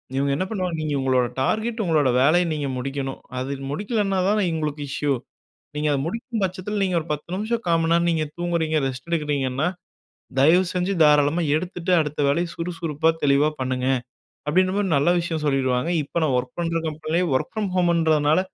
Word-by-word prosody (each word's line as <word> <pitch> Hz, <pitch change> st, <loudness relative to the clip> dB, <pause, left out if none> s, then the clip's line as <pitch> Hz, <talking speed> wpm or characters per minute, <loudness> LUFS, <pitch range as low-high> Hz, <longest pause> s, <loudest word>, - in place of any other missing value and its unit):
இவங்க 140 Hz, +1 st, +1 dB
என்ன 185 Hz, -, -1 dB
பண்ணுவாங்க, 185 Hz, -5 st, -2 dB
"நீங்க 155 Hz, -1 st, -2 dB
உங்களோட 130 Hz, -1 st, +2 dB, 0.2 s
டார்கெட், 220 Hz, -, 0 dB
உங்களுடைய 150 Hz, -7 st, +2 dB
வேலையை 175 Hz, +6 st, +4 dB
நீங்க 145 Hz, -2 st, -2 dB
முடிக்கணும்." 135 Hz, +1 st, -4 dB, 0.2 s
அது 135 Hz, +2 st, -3 dB, 0.2 s
முடிக்கல்லனா 200 Hz, +2 st, -1 dB
தான, 210 Hz, -, +2 dB
இவங்களுக்கு 150 Hz, -2 st, -3 dB
இஷ்யூ. 145 Hz, +1 st, -1 dB, 0.6 s
"நீங்க 150 Hz, +1 st, -1 dB
அதை 140 Hz, -, +1 dB
முடிக்கும் 230 Hz, +3 st, -4 dB
பட்சத்தில, 190 Hz, +2 st, -2 dB
நீங்க 185 Hz, -2 st, +1 dB
ஒரு 155 Hz, -, -12 dB
10 150 Hz, +4 st, -6 dB
நிமிஷம், 225 Hz, +3 st, -2 dB
1/4 165 Hz, -1 st, +3 dB
மணி 165 Hz, +1 st, +2 dB
நேரம் 170 Hz, 0 st, +3 dB
நீங்க 160 Hz, -2 st, 0 dB
தூங்குகிறீங்க. 170 Hz, -2 st, 0 dB
ரெஸ்ட் 130 Hz, +5 st, -7 dB
எடுக்கிறீங்கன்னா. 145 Hz, -2 st, 0 dB, 0.7 s
தயவு 165 Hz, +7 st, +6 dB
செஞ்சு 180 Hz, +2 st, 0 dB
தாராளமா 150 Hz, +2 st, +4 dB
எடுத்துட்டு 180 Hz, +2 st, -3 dB
அடுத்த 150 Hz, -1 st, -2 dB
வேலைய 170 Hz, +5 st, +1 dB
சுறுசுறுப்பா 165 Hz, -2 st, -1 dB
தெளிவா 145 Hz, +1 st, +4 dB
பண்ணுங்க" 130 Hz, 0 st, -1 dB, 0.6 s
அப்பிடின்ற 185 Hz, +5 st, +3 dB
மாரி 205 Hz, -1 st, +1 dB
நல்ல 145 Hz, +5 st, +2 dB
விஷயம் 170 Hz, -2 st, -2 dB
சொல்லிடுவாங்க. 130 Hz, 0 st, +1 dB
இப்போ 140 Hz, -, -6 dB
நான் 150 Hz, -4 st, +1 dB
வொர்க் 125 Hz, 0 st, -4 dB
பண்ற 165 Hz, -1 st, 0 dB
கம்பெனிலேயே 155 Hz, +3 st, -1 dB
வொர்க் 130 Hz, -, 0 dB
ஃப்ரம் 215 Hz, -2 st, -1 dB
ஹோம்ன்றதுனால, 160 Hz, -3 st, +3 dB
160 Hz, 170 wpm, -23 LUFS, 145-180 Hz, 0.7 s, தயவு